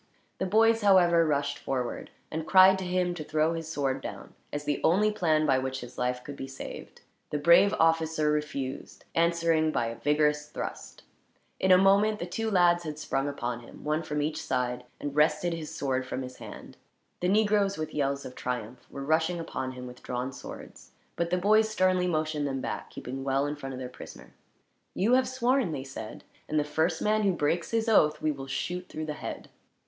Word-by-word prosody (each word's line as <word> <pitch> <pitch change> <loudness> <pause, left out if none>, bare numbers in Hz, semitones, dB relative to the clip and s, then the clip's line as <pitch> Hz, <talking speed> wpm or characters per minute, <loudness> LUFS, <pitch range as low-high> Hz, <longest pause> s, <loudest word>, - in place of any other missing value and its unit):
The 190 - 0
boys, 225 +3 +4
however, 175 -5 +5
rushed 140 -1 0
forward; 125 -2 -3 0.2
and 160 0 -4
cried 190 0 +7
to 190 - -4
him 180 0 0
to 165 -3 -6
throw 155 +2 +1
his 165 -1 -5
sword 135 -4 -1
down, - - -8 0.2
as 145 0 -4
the 145 -1 -1
only 210 +6 +4
plan 160 -7 +2
by 135 -3 +3
which 130 0 -3
his 120 0 -10
life 125 0 -2
could 145 - -8
be 135 - -6
saved. 135 - -9 0.3
The 150 - -1
brave 170 +6 +6
officer 160 -1 +2
refused, 150 -3 -4
answering 165 -1 +2
by 120 - 0
a 115 0 -5
vigorous 150 0 +2
thrust. - - -7 0.6
In 190 - +3
a 185 - +9
moment 200 +3 +4
the 175 - -4
two 220 +5 -3
lads 175 -3 +4
had 155 -2 -5
sprung 140 -2 -1
upon 120 -4 -3
him, 120 - -13
one 150 +2 0
from 150 -2 -2
each 150 +1 -2
side, 125 -1 -2
and 145 -1 -5
wrested 150 +3 +2
his 160 -2 -5
sword 130 -2 -2
from 130 - -3
his 125 0 -9
hand. - - -10 0.4
The 180 - 0
negroes, 205 -1 +2
with 155 0 -4
yells 140 -1 -1
of 130 - -7
triumph, 125 -1 -5
were 140 - -7
rushing 160 +3 +1
upon 130 -5 -4
him 125 0 -8
with 125 0 -10
drawn 125 +2 -4
swords; - - -11 0.2
but 170 0 -1
the 180 - +1
boys 215 +4 +4
sternly 185 -3 +2
motioned 155 -3 -1
them 135 -1 -2
back, - - -5
keeping 135 +2 -6
well 135 +1 +1
in 145 +1 -2
front 135 -2 -7
of - - -6
their 130 - -5
prisoner. 125 - -12 0.6
"You 220 +6 +2
have 260 0 +3
sworn," 255 -4 +1
they 140 -4 -4
said, 130 -5 -8 0.3
"and 155 - +2
the - - +2
first 160 +3 0
man 215 +1 +2
who 200 -3 +2
breaks 170 +1 0
his 225 0 0
oath 155 -9 +4
we 155 - +1
will 135 -2 -7
shoot 180 +6 -3
through 155 - -5
the 150 - -3
head." - - -7
155 Hz, 205 wpm, -28 LUFS, 135-180 Hz, 0.6 s, a